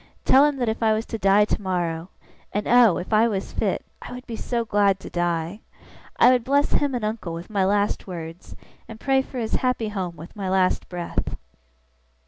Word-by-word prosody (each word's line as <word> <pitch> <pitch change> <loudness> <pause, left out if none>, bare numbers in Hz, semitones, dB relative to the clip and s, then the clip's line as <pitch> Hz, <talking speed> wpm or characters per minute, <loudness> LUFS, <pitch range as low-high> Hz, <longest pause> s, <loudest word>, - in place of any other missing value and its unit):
Tell 270 +2 +6
him 295 -1 +1
that 245 -3 -1
if 220 +1 -2
I 220 -1 +4
was 220 +1 -1
to 225 - -5
die 195 +1 +5
tomorrow 175 -4 -2 0.4
(and 205 - -2
oh, 235 -7 +6
if 185 - -5
I 220 +2 +5
was 195 -4 -3
fit, - - -1 0.2
I - - -9
would 250 +1 -9
be 235 - -6
so 235 +1 -2
glad 200 -3 +2
to - - -9
die!) 175 +2 -1 0.6
I - - +7
would 250 -2 +2
bless 280 +3 +2
him 285 -3 +1
and 235 -3 -2
uncle 215 -6 -3
with 170 +5 -8
my 195 -3 +2
last 205 +1 0
words, 165 -1 -8 0.3
and 225 -1 -10
pray 270 +1 +2
for 265 - -9
his 225 -2 -3
happy 250 -4 0
home 185 -4 -4
with 165 +3 -11
my 195 -3 -3
last 185 -1 +1
breath! 175 -1 -4
210 Hz, 205 wpm, -24 LUFS, 185-235 Hz, 0.6 s, I